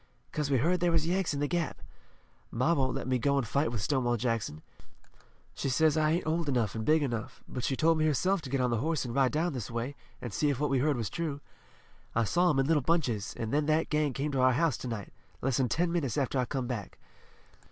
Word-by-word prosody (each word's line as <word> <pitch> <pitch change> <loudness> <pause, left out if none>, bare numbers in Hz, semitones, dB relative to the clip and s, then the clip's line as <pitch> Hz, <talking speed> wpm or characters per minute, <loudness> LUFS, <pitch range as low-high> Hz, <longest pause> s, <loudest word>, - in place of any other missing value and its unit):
"'Cause 150 -2 -2
we 135 - +3
heard 175 +9 +2
there 175 0 +2
was 165 -2 +2
Yanks 180 +1 0
in 145 - -2
the 145 - +1
Gap. 170 +1 -2 0.7
Ma 130 +8 +1
won't 130 -4 +1
let - - -3
me 130 -1 +1
go 140 +3 +2
an' 135 - +2
fight 140 +3 0
with 110 -4 -3
Stonewall 120 -1 +1
Jackson. 115 -10 -2 0.9
She - - -2
says 155 +3 +3
I 155 -1 +3
ain't 175 - -1
old 160 -1 0
enough 115 -7 0
an' 110 - -3
big 155 +4 +3
enough, 120 -5 -4
but 125 - -5
she 135 - 0
told 160 +3 +3
me 155 - +2
herself 185 +6 +1
to 135 - -8
get 135 +1 0
on 125 -1 +1
the 115 - +1
horse 155 +2 -1
an' 120 - -4
ride 135 -1 +3
down 160 +2 0
this 125 -6 -5
way, 120 +4 -3 0.2
an' 120 - -6
see 145 +9 +1
if 135 -3 -1
what 150 -1 0
we 135 - +3
heard 145 0 +2
was 110 -6 -3
true. 155 -4 -3 0.8
I 115 - +3
saw 175 - +2
'em 150 - +2
in 135 - +3
little 155 0 +3
bunches, 130 -9 0
an' 110 -1 -4
then 150 +1 +1
that 155 +1 +2
gang 150 -2 +1
come 145 +3 -2
to 135 -2 0
our 130 0 +5
house 155 +2 +2
to - - -6
night, 110 -5 -5 0.3
less 135 0 0
'n 125 -2 +2
ten 170 +6 +1
minutes 150 -9 -1
after 135 -1 0
I 125 - +1
come 130 0 -3
back. 120 -5 -5
140 Hz, 255 wpm, -30 LUFS, 125-155 Hz, 0.9 s, our